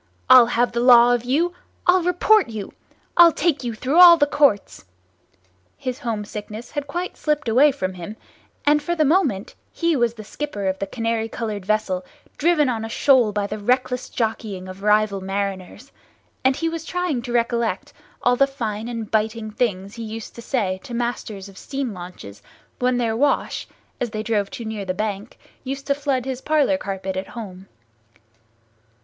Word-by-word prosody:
—I'll 255 -2 +9
have 245 0 +1
the 235 - -2
law 245 0 +7
of 240 0 -1
you! 325 +8 +1 0.3
I'll 365 +1 +5
report 360 - +3
you! 215 -3 -6 0.4
I'll 345 -1 +9
take 310 -3 0
you 235 -2 -3
through 270 +9 +1
all 345 -1 +10
the 290 - +4
Courts!" 285 -8 +1 0.9
His 255 +1 -4
home 225 -6 -3
sickness 215 +2 -8
had 290 -1 -4
quite 350 +5 -4
slipped 300 -3 -1
away 265 +6 +5
from 190 -9 -3
him, 185 +4 -8 0.5
and 295 +1 +4
for 345 +3 -2
the 310 -2 +2
moment 280 - +1 0.2
he 335 -1 0
was 240 -3 +1
the 215 - -9
skipper 210 -2 -5
of 190 0 -1
the 195 - -3
canary 225 +1 -2
coloured 215 -5 -5
vessel 205 -4 0 0.4
driven 310 -2 +3
on 230 -3 -1
a 225 - -5
shoal 250 -2 +4
by 205 0 -1
the 210 +1 -5
reckless 250 +3 0
jockeying 215 -5 -3
of 185 +1 -10
rival 210 -1 +2
mariners, 195 +5 -4 0.5
and 260 0 +3
he 330 - -2
was 330 -1 -4
trying 355 -7 -2
to 240 0 -7
recollect 235 -3 -1 0.3
all 245 0 +4
the 275 +2 +4
fine 225 -5 -4
and 230 -3 -5
biting 220 0 -1
things 205 -4 -2
he 230 0 -7
used 220 0 -7
to 235 - -10
say 205 -7 -1
to 240 - -7
masters 235 -4 -4
of 195 -1 -13
steam 270 -4 -4
launches 175 - -10 0.4
when 250 0 +1
their 230 -2 0
wash, 280 +5 0 0.3
as 245 - -1
they 215 0 -4
drove 210 -3 0
too 235 - -7
near 220 -2 -4
the 185 -1 -3
bank, 210 +2 -4 0.3
used 275 +1 -5
to 280 - +2
flood 275 -3 -1
his 265 -1 -4
parlour 300 -1 +2
carpet 195 -4 -4
at 190 +1 -4
home. 195 -5 -9
235 Hz, 180 wpm, -22 LUFS, 210-275 Hz, 0.9 s, all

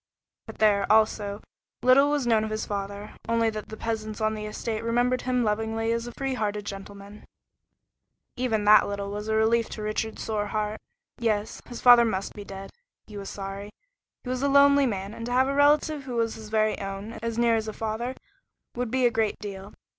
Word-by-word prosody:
But - - -9
there, 205 -2 +3
also, 215 -2 +2 0.4
little 270 +3 +6
was 290 -3 0
known 225 -2 +3
of 220 - -3
his 215 0 -3
father, 200 +1 -5 0.2
only 230 -1 +2
that 215 -1 -7
the 220 - -8
peasants 220 -1 -4
on 215 0 +1
the 215 -1 -5
estate 220 +1 -4
remembered 245 +2 +1
him 250 -1 0
lovingly 225 +1 -1
as 230 +1 -1
a - - -6
free 270 -1 -2
hearted 210 -3 -2
gentleman. 200 +1 -9 1.1
Even 240 -5 0
that 210 +1 +7
little 200 0 -4
was 210 +1 -5
a 220 - +1
relief 225 +1 +2
to 215 - -6
Richard's 215 +1 -3
sore 210 -2 -2
heart. 215 +1 -2 0.4
Yes, 215 -2 -1
his 240 - -8
father 245 -1 +8
must 195 -4 -2
be 205 - -8
dead. 195 0 -9 0.3
He 210 - -12
was 200 -1 -6
sorry. 195 +1 -6 0.5
He 250 - -7
was 255 0 -2
a 280 - +2
lonely 280 0 +6
man, 200 -2 -4
and 230 - -8
to - - -4
have 260 +1 +4
a 275 - 0
relative 295 +1 +3
who 250 -2 -5
was 230 -1 0
his 220 -1 -10
very 215 0 +1
own, 195 +3 -6
as 230 0 -3
near 235 -1 +3
as 220 -1 -2
a - - -2
father, 225 +4 -3 0.6
would 245 -1 -3
be 255 +1 +1
a 240 - +4
great 225 -2 0
deal. 200 -1 -8
220 Hz, 205 wpm, -26 LUFS, 210-240 Hz, 1.1 s, father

